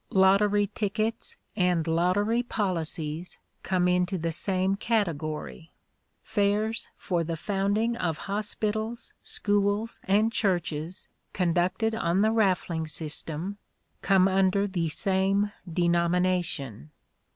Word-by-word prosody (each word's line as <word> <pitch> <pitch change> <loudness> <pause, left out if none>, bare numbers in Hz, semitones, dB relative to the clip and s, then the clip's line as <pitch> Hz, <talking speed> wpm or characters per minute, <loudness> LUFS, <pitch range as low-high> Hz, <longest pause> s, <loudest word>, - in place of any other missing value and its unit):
Lottery 200 +2 +4
tickets 215 +2 -3 0.2
and 180 -5 +2
lottery 185 +8 +2
policies 170 -7 -3 0.2
come 180 -1 +1
into 180 +1 +1
the 165 0 -2
same 190 +3 0
category. 165 -7 -2 0.5
Fairs 215 +1 0
for 175 -3 -1
the 165 0 -3
founding 205 +5 0
of 165 -6 -1
hospitals, 215 +2 -3
schools 205 +2 0
and 210 +4 +3
churches, 175 -4 -1 0.3
conducted 180 +5 +1
on 190 -4 +1
the 220 - +3
raffling 180 -7 +1
system, 160 +5 -4 0.4
come 190 -1 +4
under 195 +1 +2
the 175 -5 -1
same 195 +4 +1 0.2
denomination. 170 - 0
190 Hz, 100 wpm, -27 LUFS, 170-205 Hz, 0.5 s, Lottery